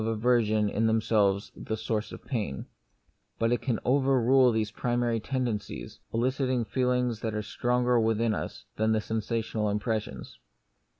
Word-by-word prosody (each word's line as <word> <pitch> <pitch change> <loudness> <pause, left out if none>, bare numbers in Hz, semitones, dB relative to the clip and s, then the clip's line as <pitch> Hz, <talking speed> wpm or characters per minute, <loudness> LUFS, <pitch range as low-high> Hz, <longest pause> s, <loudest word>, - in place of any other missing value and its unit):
1 - - -2
1 115 - +1
aversion 110 -2 +2
in 110 +2 +1
themselves 105 -3 +2
the 110 - -4
source 110 0 -2
of - - -10
pain; 105 - -3 0.7
but 115 0 +1
it 120 - +1
can 120 -5 -1
overrule 130 -1 +4
these 110 -2 -1
primary 120 0 0
tendencies, 120 -4 -3
eliciting 130 +1 0
feelings 125 -2 0
which 110 - -1
are 105 - -2
stronger 125 +1 +1
within 110 0 +1
us - - -5
than 110 +1 +2
the 110 - +2
sensational 110 0 -2
impressions. 105 - -3
115 Hz, 145 wpm, -28 LUFS, 110-125 Hz, 0.7 s, overrule